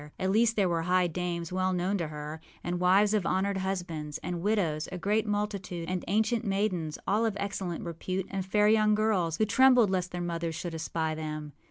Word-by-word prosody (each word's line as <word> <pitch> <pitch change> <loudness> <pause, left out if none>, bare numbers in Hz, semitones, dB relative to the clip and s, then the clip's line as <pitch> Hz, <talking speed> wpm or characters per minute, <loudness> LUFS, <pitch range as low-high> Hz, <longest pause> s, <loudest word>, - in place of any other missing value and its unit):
At 190 0 0
least 225 +2 +3
there 200 -3 +3
were 170 -2 0
high 180 +2 +2
dames 175 0 -3
well 185 0 +1
known 180 +3 0
to 165 - -1
her, 150 +1 -7 0.2
and 175 0 -2
wives 195 +4 +4
of 210 -3 +2
honored 190 +2 0
husbands, 175 -6 -3
and 175 -1 -3
widows, 175 -7 0
a 185 - -4
great 210 +4 0
multitude, 205 -5 -2
and 185 -1 -2
ancient 220 +4 +1
maidens, 190 -6 -1
all 210 +3 +2
of 220 -3 0
excellent 195 -4 -3
repute, 180 +3 -3
and 195 -1 -2
fair 210 +2 +2
young 215 -1 +4
girls, 190 -7 +1
who 215 - +3
trembled 250 -2 +5
lest 180 -1 0
their 175 - -4
mothers 170 -1 -2
should 175 +1 -5
espy 160 0 -2
them. 155 -1 -5
185 Hz, 200 wpm, -29 LUFS, 170-205 Hz, 0.2 s, trembled